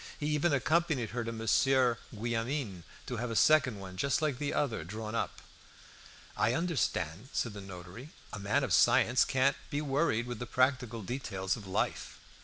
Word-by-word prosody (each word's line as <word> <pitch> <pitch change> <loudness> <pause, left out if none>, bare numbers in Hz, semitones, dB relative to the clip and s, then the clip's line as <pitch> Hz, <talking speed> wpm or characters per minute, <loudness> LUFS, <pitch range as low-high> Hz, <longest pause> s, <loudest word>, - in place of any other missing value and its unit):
He 150 - -3
even 150 +2 +2
accompanied 145 -3 +1
her 120 +1 -2
to 115 - -4
Monsieur 120 +2 +2
Guillaumin 115 - -2 0.2
to 125 - -4
have 120 +2 -3
a 115 - -3
second 145 -6 +4
one, 95 -1 -9
just 140 +7 +1
like 150 -5 -1
the 145 -1 -1
other, 120 - -1
drawn 110 +5 -6
up. 115 - -3 0.9
"I 105 +3 +2
understand," 130 - -1
said 115 - -1
the 100 - -7
notary; 95 - -10 0.2
"a 105 - -5
man 105 +8 +1
of 115 -9 0
science 125 +4 +5
can't 135 +1 +2
be 145 - -1
worried 140 -5 +1
with 120 0 -5
the 120 - -5
practical 125 -4 +1
details 95 -5 -2
of 105 -5 -10
life." 95 - -2
120 Hz, 175 wpm, -31 LUFS, 105-140 Hz, 0.9 s, science